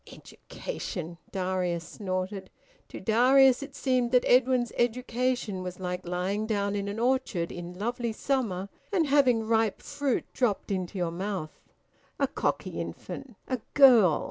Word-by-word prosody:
Education!... 175 Hz, -, -7 dB
Darius 180 Hz, -3 st, -1 dB
snorted. 190 Hz, 0 st, -4 dB, 0.4 s
To -, -, -8 dB
Darius 255 Hz, +3 st, +5 dB
it 280 Hz, 0 st, -8 dB
seemed 255 Hz, -3 st, +1 dB
that 250 Hz, -, +4 dB
Edwin's 250 Hz, -1 st, +3 dB
education 245 Hz, -3 st, 0 dB
was 180 Hz, 0 st, -6 dB
like 180 Hz, -1 st, -4 dB
lying 190 Hz, +5 st, -1 dB
down 200 Hz, -2 st, 0 dB
in 200 Hz, 0 st, -2 dB
an 200 Hz, +1 st, -4 dB
orchard 240 Hz, -8 st, 0 dB
in 175 Hz, 0 st, -7 dB
lovely 235 Hz, +3 st, -2 dB
summer 215 Hz, -6 st, -1 dB, 0.2 s
and 360 Hz, -5 st, +2 dB
having 270 Hz, -5 st, +4 dB
ripe 225 Hz, -2 st, +1 dB
fruit 280 Hz, -3 st, -2 dB
dropped 220 Hz, -5 st, 0 dB
into 185 Hz, 0 st, -3 dB
your 175 Hz, -2 st, -1 dB
mouth... 185 Hz, -2 st, -4 dB, 0.6 s
A -, -, +4 dB
cocky -, -, -2 dB
infant! 270 Hz, -5 st, -7 dB
A 255 Hz, -1 st, -1 dB, 0.2 s
girl! 235 Hz, -, +7 dB
215 Hz, 140 wpm, -28 LUFS, 185-255 Hz, 0.6 s, girl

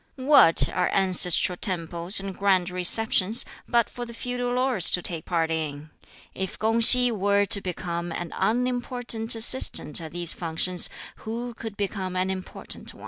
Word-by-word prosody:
"What 260 Hz, -, +4 dB
are 180 Hz, -, -2 dB
ancestral 180 Hz, -2 st, +4 dB
temples 170 Hz, 0 st, -1 dB
and 195 Hz, -1 st, -7 dB
Grand 190 Hz, -3 st, 0 dB
Receptions, 190 Hz, +4 st, +1 dB, 0.2 s
but 235 Hz, -2 st, +1 dB
for 245 Hz, -, -8 dB
the 235 Hz, -1 st, -9 dB
feudal 245 Hz, 0 st, -4 dB
lords 250 Hz, -8 st, +2 dB
to 180 Hz, -, +1 dB
take 165 Hz, -3 st, -4 dB
part 165 Hz, -2 st, -1 dB
in? 155 Hz, -1 st, -5 dB, 0.4 s
If 190 Hz, -1 st, -6 dB
Kung 225 Hz, +1 st, 0 dB
si 245 Hz, +1 st, +5 dB
were 200 Hz, -1 st, 0 dB
to 200 Hz, 0 st, -2 dB
become 175 Hz, -1 st, -5 dB
an 170 Hz, 0 st, -6 dB
unimportant 245 Hz, -1 st, 0 dB
assistant 225 Hz, -, +3 dB
at 160 Hz, -1 st, -9 dB
these 175 Hz, -1 st, -2 dB
functions, 175 Hz, +2 st, +1 dB, 0.3 s
who 235 Hz, +2 st, -7 dB
could 225 Hz, -2 st, -9 dB
become 195 Hz, -2 st, -4 dB
an 185 Hz, +1 st, -1 dB
important 185 Hz, -1 st, -5 dB
one?" -, -, -18 dB
195 Hz, 155 wpm, -24 LUFS, 175-230 Hz, 0.4 s, si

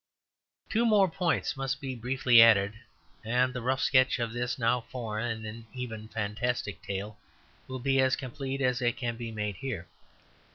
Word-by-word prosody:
Two 225 Hz, +2 st, +1 dB
more 210 Hz, -4 st, +5 dB
points 175 Hz, -3 st, 0 dB
must 135 Hz, 0 st, -2 dB
be 135 Hz, -2 st, -4 dB
briefly 125 Hz, 0 st, +4 dB
added; 105 Hz, -3 st, +6 dB, 0.5 s
and 125 Hz, +3 st, +1 dB
the 125 Hz, -, -4 dB
rough 130 Hz, +3 st, 0 dB
sketch 130 Hz, -1 st, +4 dB
of 115 Hz, -1 st, -2 dB
this 120 Hz, +1 st, -2 dB
now 120 Hz, 0 st, +2 dB
foreign 110 Hz, -2 st, -3 dB
and 115 Hz, +1 st, -8 dB
even 110 Hz, -4 st, -6 dB
fantastic 110 Hz, -1 st, -3 dB
state 100 Hz, +2 st, -4 dB, 0.5 s
will 130 Hz, 0 st, -5 dB
be 135 Hz, +1 st, +2 dB
as 130 Hz, -1 st, +3 dB
complete 135 Hz, +1 st, -5 dB
as 125 Hz, -1 st, +1 dB
it 120 Hz, -1 st, +1 dB
can 120 Hz, -4 st, -2 dB
be 115 Hz, -1 st, -6 dB
made 105 Hz, -3 st, -3 dB
here. 110 Hz, -11 st, -5 dB
120 Hz, 165 wpm, -29 LUFS, 110-130 Hz, 0.5 s, added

